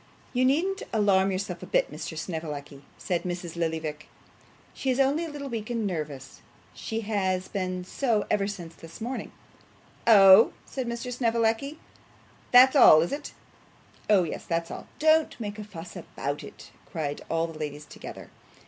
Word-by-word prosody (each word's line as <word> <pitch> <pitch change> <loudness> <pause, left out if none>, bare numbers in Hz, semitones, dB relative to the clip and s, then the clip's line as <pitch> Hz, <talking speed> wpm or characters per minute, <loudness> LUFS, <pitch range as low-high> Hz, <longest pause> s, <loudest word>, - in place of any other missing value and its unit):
'You 255 0 +2
needn't 360 +9 +1
alarm 195 -3 +3
yourself 190 +1 -4
a - - -8
bit, - - +1
Mr. 160 - -6
Snevellicci,' 150 -4 -5 0.2
said 175 -2 -1
Mrs. 175 -2 -5
Lillyvick. 160 -2 -3 0.7
'She 265 - -3
is 255 +1 +1
only 280 +5 +2
a - - -6
little 290 -2 -6
weak 230 -4 -5
and 230 -3 -1
nervous; 150 -8 -5 0.3
she 225 -1 -4
has 190 -4 -1
been 185 -2 -3
so 220 +2 0
ever 200 -1 +2
since 175 -5 -7
the 165 0 -13
morning.' 245 +3 -5 0.8
'Oh,' 200 -1 +8
said 260 -3 -4
Mr. 235 +1 -4
Snevellicci, 235 +4 0 0.7
'that's 255 +3 +7
all, 155 - +8
is 170 - -4
it?' 290 +1 -5 0.8
'Oh 200 -4 +5
yes, 165 - -5
that's 165 0 -1
all. - - -8
Don't 315 -2 +3
make 210 -1 -5
a - - -5
fuss 175 -4 -10
about 145 -4 -5
it,' - - -12 0.2
cried 150 -5 -3
all 165 0 +1
the 165 -2 -8
ladies 150 -1 -5
together. - - -10
200 Hz, 160 wpm, -27 LUFS, 165-245 Hz, 0.8 s, Oh